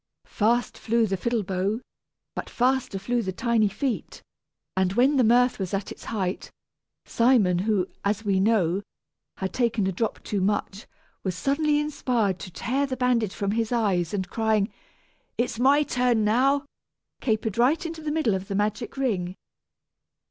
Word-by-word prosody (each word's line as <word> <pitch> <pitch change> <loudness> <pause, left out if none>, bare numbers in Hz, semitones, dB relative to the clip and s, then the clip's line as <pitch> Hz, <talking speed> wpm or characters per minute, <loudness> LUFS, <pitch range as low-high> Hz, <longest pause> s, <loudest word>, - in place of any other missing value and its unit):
Fast 235 +3 0
flew 230 0 +2
the 195 -2 -1
fiddle 230 +3 -1
bow, 190 +4 -1 0.5
but - - -5
faster 255 -4 +1
flew 240 +5 -1
the 190 -4 -3
tiny 230 +2 +2
feet; 240 +4 -3 0.5
and 190 0 +1
when 260 +6 +4
the 255 - +5
mirth 245 +1 +4
was 190 0 -2
at 195 0 -4
its - - -10
height, 190 -4 -3 0.6
Simon 230 -7 +3
who, 200 -1 +1 0.2
as 210 +2 -1
we 195 -2 +2
know, 195 -3 +2 0.6
had 190 0 -3
taken 235 -5 +1
a 190 - +1
drop 215 +4 -3
too 205 -2 -2
much, 205 +1 -1 0.4
was 185 -3 -2
suddenly 295 +4 +1
inspired 245 - 0
to 185 - -7
tear 260 +9 -1
the 260 -1 -4
bandage 240 -5 +1
from 200 -1 -1
his 225 +1 -1
eyes, 195 -8 +1
and 190 -3 -2
crying, 220 -2 +1 0.6
"It's 235 -1 -1
my 280 +4 +5
turn 245 -5 +1
now," 270 +6 +3 0.6
capered 220 -2 -1
right 275 +8 +3
into 330 -1 -5
the 305 -1 -3
middle 295 -9 +1
of 190 0 -3
the 200 - -3
magic 210 +5 -2
ring. 190 -9 -1
220 Hz, 165 wpm, -25 LUFS, 195-250 Hz, 0.6 s, the